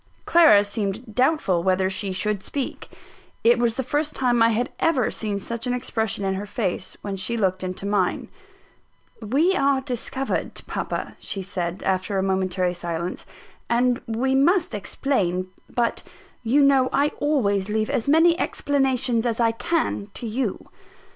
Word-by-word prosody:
Clara 310 -12 +6
seemed 210 +2 -4
doubtful 250 - +2
whether 185 +1 +2
she 190 +1 -2
should 205 +1 -2
speak. 275 +5 -4 0.5
It 235 +1 +5
was 235 0 +1
the 265 - 0
first 295 +4 -1
time 245 -3 +2
I 230 - +6
had 230 +2 -1
ever 275 -8 +2
seen 210 -2 -2
such 235 +5 -4
an 250 - 0
expression 220 -5 -2
in 190 - 0
her 200 +2 -4
face, 185 -4 -3
when 200 -1 -3
she 235 +5 -2
looked 185 -3 0
into 185 +1 -4
mine. 200 -3 0 0.9
"We 280 - +2
are 275 -6 +2
discovered, 265 0 -3
papa," - - -4
she 195 - -4
said, 180 -1 -4
after 190 +1 0
a 190 - +1
momentary 185 -1 0
silence, 170 +1 -4 0.4
"and 245 +1 +2
we 240 +4 0
must 325 +4 +3
explain: 190 -4 -1 0.2
but 235 -1 -1 0.4
you 260 +5 +3
know 270 -2 +4
I 285 +2 +2
always 210 -10 +1
leave 215 0 0
as 230 - -1
many 330 +4 +5
explanations 265 -4 +1
as 230 -1 -1
I 230 -1 +3
can 230 -4 -1
to - - -5
you." 230 -2 -2
225 Hz, 155 wpm, -23 LUFS, 195-265 Hz, 0.9 s, Clara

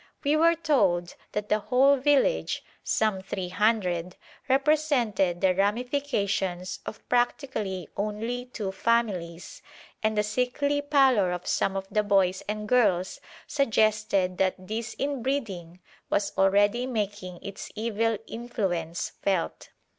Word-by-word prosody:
We 290 +1 +3
were 335 +2 +5
told 195 - +1 0.2
that 210 0 -2
the 210 - +3
whole 265 +6 +4
village 290 - +2 0.2
some 215 -4 +1
three 190 -1 -4
hundred 185 -4 0 0.3
represented 265 - +2
the 185 -1 +4
ramifications 200 -4 -1
of - - -8
practically 230 - -1
only 220 +4 -3
two 215 -6 -5
families, 190 -5 -1 0.4
and 215 0 0
the 210 - +3
sickly 250 +6 0
pallor 265 -10 +3
of 180 0 -4
some 195 - 0
of 195 0 -3
the 210 - +2
boys 195 -3 +2
and 210 0 -3
girls 200 -7 +2 0.2
suggested 215 -8 +1
that 190 -1 +2
this 220 +4 -5
inbreeding 235 -11 -3 0.3
was 200 - 0
already 205 +5 +3
making 205 -6 -3
its 200 -1 -7
evil 225 0 0
influence 190 -8 -3
felt. 190 -4 -1
210 Hz, 120 wpm, -27 LUFS, 190-250 Hz, 0.4 s, were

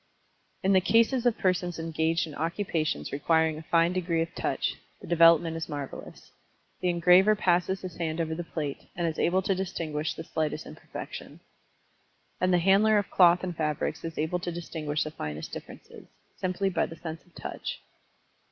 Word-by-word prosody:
In 195 +1 +4
the 190 - +5
cases 230 +5 +3
of 235 - +2
persons 180 -2 0
engaged 165 0 0
in 155 - -9
occupations 160 - -2
requiring 160 +2 +2
a - - -8
fine 165 +2 +2
degree 170 -3 0
of 165 - -9
Touch, - - -1 0.3
the - - -11
development 165 -1 +5
is 165 -1 -4
marvelous. 145 -2 -7 0.5
The 180 - 0
engraver 180 +4 +5
passes 185 -1 +1
his 180 -3 -7
hand 165 -1 -2
over 160 -1 -1
the 175 +2 -4
plate, 150 -4 -5
and 175 - -1
is 160 -1 -2
able 185 +2 +2
to 195 - +1
distinguish 165 -5 -3
the 160 - -6
slightest 155 -1 -2
imperfection. - - -9 1.0
And 185 0 +2
the 180 - +5
handler 195 +5 +4
of 205 - -1
cloth 175 -1 +5
and 180 -2 -3
fabrics 150 -2 -2
is 165 -1 -6
able 160 +4 0
to 175 0 -4
distinguish 160 -3 -3
the 155 - -5
finest 75 - -6
differences, - - -10 0.3
simply 190 +1 -1
by - - +1
the 165 - -9
sense 160 -1 -7
of 175 - -28
touch. - - -5
170 Hz, 175 wpm, -28 LUFS, 160-185 Hz, 1.0 s, the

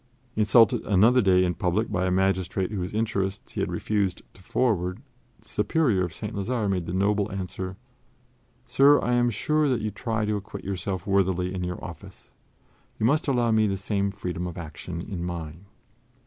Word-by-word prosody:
Insulted 110 +1 +4
another 110 +6 +5
day 95 -3 +4
in 90 - 0
public 90 +7 -1
by 95 -2 0
a - - +1
magistrate 95 0 0
whose 95 -2 -3
interests 100 -3 -2
he - - -5
had - - -1
refused 100 -4 -1
to - - -18
forward, 95 -3 0 0.4
the - - -22
Superior 110 - +1
of 90 - -3
St. 105 +7 -6
Lazare 110 +2 -1
made 90 -4 -1
the - - -3
noble 100 +2 +1
answer: 95 0 -5 0.9
"Sir, 145 +2 +5
I 125 - 0
am 120 0 +3
sure 150 +7 +1
that 125 -4 +1
you 105 0 -2
try 110 +1 -2
to 105 0 0
acquit 100 0 -8
yourself 95 -1 -3
worthily 95 -2 +1
in 90 -1 -3
your 90 0 -4
office; 90 +2 -11 0.6
you 110 - 0
must 150 +7 +2
allow 120 -4 +2
me 110 -1 +3
the 95 -1 -1
same 100 0 -1
freedom 90 -3 -4
of 85 - -7
action 85 +1 -6
in 90 -2 -5
mine." 85 0 -6
100 Hz, 180 wpm, -26 LUFS, 90-110 Hz, 0.9 s, another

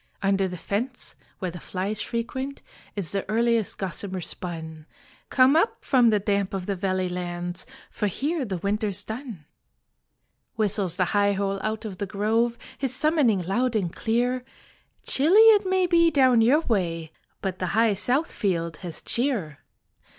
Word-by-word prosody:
Under 195 -1 +2
the 180 -1 -6
fence 240 +9 -4 0.2
where 185 -2 -3
the 175 - -8
flies 195 +5 -3
frequent 260 +5 -4 0.3
Is 195 -6 -2
the 195 -1 -1
earliest 230 -1 +1
gossamer 190 +1 -3
spun. 160 -3 -6 0.4
Come 260 +2 +5
up 335 +8 +1
from 250 -4 +4
the 215 - +3
damp 200 -1 -1
of 185 -2 -4
the 200 - -2
valley 185 -1 -1
lands, 175 0 -4 0.2
For 210 - -1
here 290 - -2
the 195 -6 -3
winter's 205 +1 -1
done." 220 - -7 1.1
Whistles 200 -5 0
the 185 - +2
high 205 0 +3
hole 195 0 -1
out 215 +2 -3
of 195 -4 -7
the 200 - -2
grove 225 +4 0 0.2
His 265 -2 -1
summoning 265 - +2
loud 240 +7 0
and 180 -6 -1
clear: 245 +3 0 0.6
"Chilly 305 +8 +3
it 435 -3 +7
may 375 -1 +2
be 340 -1 +4
down 260 -6 +4
your 265 +8 +4
way 170 - -1 0.3
But 190 -2 -4
the 185 - -1
high 225 -2 +4
south 255 - 0
field 170 -7 -1
has 170 -2 -6
cheer. 225 - 0
205 Hz, 160 wpm, -25 LUFS, 185-250 Hz, 1.1 s, it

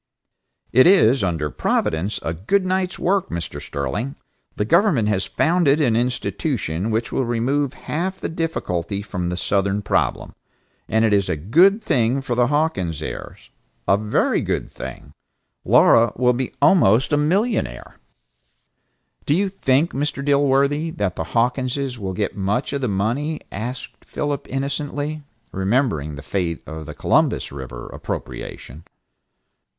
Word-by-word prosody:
"It 130 +5 +7
is, 135 - +5
under 80 -5 -1
Providence, 85 +6 0
a 80 - -2
good 150 - 0
night's 185 -1 -1
work, 190 +1 +1
Mr. 80 -4 -5
Sterling. 75 - -3 0.4
The 105 - -1
government 160 - +3
has 100 -2 0
founded 160 -3 +2
an 125 -7 +2
institution 115 - -1
which 110 +1 -1
will 135 - 0
remove 130 +4 0
half 185 +5 -3
the - - -3
difficulty 100 - -3
from 90 -4 -3
the 90 - -3
southern 100 +2 0
problem. - - 0 0.6
And 110 +1 +3
it 110 - +2
is 100 -2 +2
a 90 - +1
good 170 - +4
thing 130 - +2
for 125 - -3
the 120 0 +3
Hawkins 130 - 0
heirs, - - -8 0.4
a 95 - +5
very 105 +1 +1
good - - -2
thing. - - -9 0.5
Laura 115 -1 +5
will 125 0 +3
be 125 0 -2
almost 135 - +4
a - - +6
millionaire." 155 - 0 1.3
"Do 145 - +3
you 195 +2 +1
think, 150 -4 +1
Mr. 140 0 -2
Dilworthy, 140 +2 +2
that 100 -4 -1
the 80 - -3
Hawkinses 125 - -1
will 95 -2 -3
get 100 +2 -2
much 105 +8 -1
of 140 - -2
the 125 - 0
money?" 120 +10 -1
asked 120 +5 -6
Philip 145 -2 -3
innocently, 145 +2 -3 0.3
remembering 95 - 0
the 70 - -9
fate 85 +1 -2
of 80 -1 -8
the 75 - -7
Columbus - - +1
River 65 -3 -8
appropriation. 75 +6 -7
120 Hz, 145 wpm, -21 LUFS, 95-145 Hz, 1.3 s, It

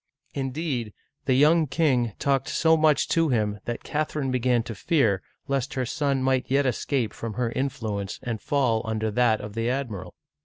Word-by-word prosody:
" - - -57
Indeed, 135 -5 -3 0.3
the 130 - +3
young 155 +4 +5
king 130 -6 +1
talked 135 -1 +1
so 160 0 +4
much 155 -3 +3
to 165 -1 +2
him 105 -4 0
that 120 - -4
Cath 150 0 -2
erine 135 -4 -1
began 125 -2 +2
to 115 - -6
fear 110 - +1 0.3
lest 140 +1 -1
her 130 -1 0
son 140 +1 0
might 130 -1 +1
yet 140 +1 +3
escape 125 -2 0
from 115 -1 -5
her 120 -1 -1
influence 110 -7 -3
and 115 -4 -3
fall 130 -7 +1
under 110 -1 -2
that 115 -1 +2
of 105 0 -7
the 115 +2 -1
admiral. 110 -9 -4
130 Hz, 185 wpm, -25 LUFS, 115-140 Hz, 0.3 s, young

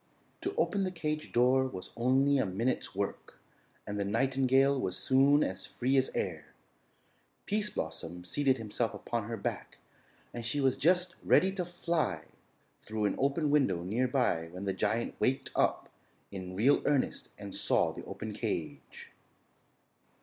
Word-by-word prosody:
To - - -3
open 200 - +1
the 185 - 0
cage 155 -3 -3
door 130 +2 +4
was 95 -7 -8
only 135 +3 +3
a - - +2
minute's 110 +4 -2
work 100 0 -4 0.5
and 105 0 -4
the - - +1
nightingale 135 +5 +2
was 90 - -2
soon 140 +3 +4
as 95 +1 -4
free 130 +2 0
as 130 -1 +3
air. 80 -5 -4 0.9
Pease 210 0 0
Blossom 80 - -5
seated 130 +8 +1
himself 110 0 -2
upon 115 -2 -3
her 115 - -3
back 100 - -5 0.6
and 120 - -5
she 120 +6 -1
was 135 -2 +3
just 180 +3 +2
ready 190 - +4
to 190 -2 -3
fly 170 - -1 0.6
through 110 -1 -3
an 100 - +1
open 140 +2 +1
window 135 -13 +2
near 115 +8 0
by 120 -11 +1
when 90 +4 -7
the 95 - 0
giant 105 +5 -1
waked 135 +2 0
up - - +1 0.4
in 95 -2 -6
real 125 +9 +4
earnest 145 -3 0
and - - -8
saw - - +2
the - - -8
open - - -6
cage. - - -5
130 Hz, 155 wpm, -31 LUFS, 100-140 Hz, 0.9 s, door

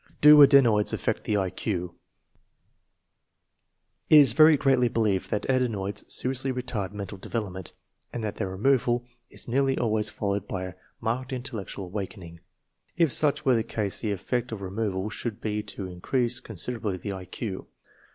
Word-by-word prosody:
Do 150 0 +9
adenoids 120 -7 +5
affect - - -2
the 105 - +1
I 95 -2 -1
Q? 90 -4 -3 2.2
It - - +7
is 140 -6 +8
very 155 +2 +7
generally 135 -3 +3
believed 110 -5 0
that 105 - -2
adenoids 105 -6 -1
seriously 130 +1 0
retard 120 -6 -4
mental 100 -1 -7
devel 110 +2 -3
opment, 95 -2 -9 0.4
and 120 - -5
that 105 - -4
their 95 - -2
removal 120 +4 +1 0.2
is - - -6
nearly 135 +2 +1
always 110 -2 0
fol 100 -2 -3
lowed 100 0 -3
by 95 -1 -4
a 90 -1 -6 0.3
marked 125 +4 -2
intellectual 120 -7 -5
awakening. 90 -3 -7 0.6
If 165 -5 +3
such 150 +3 +1
were 130 - +4
the 115 - +2
case 105 -4 -1
the 110 - -2
effect 120 +5 -2
of 110 -3 -6
removal 100 0 -3
should 115 -3 -5
be 105 -1 -2
to 105 -2 -7
in 90 -1 -9
crease 120 0 0
considerably 110 -2 -3
the 100 +3 -5
I 95 -1 -7
Q. 95 +1 -6
110 Hz, 165 wpm, -26 LUFS, 100-125 Hz, 2.2 s, Do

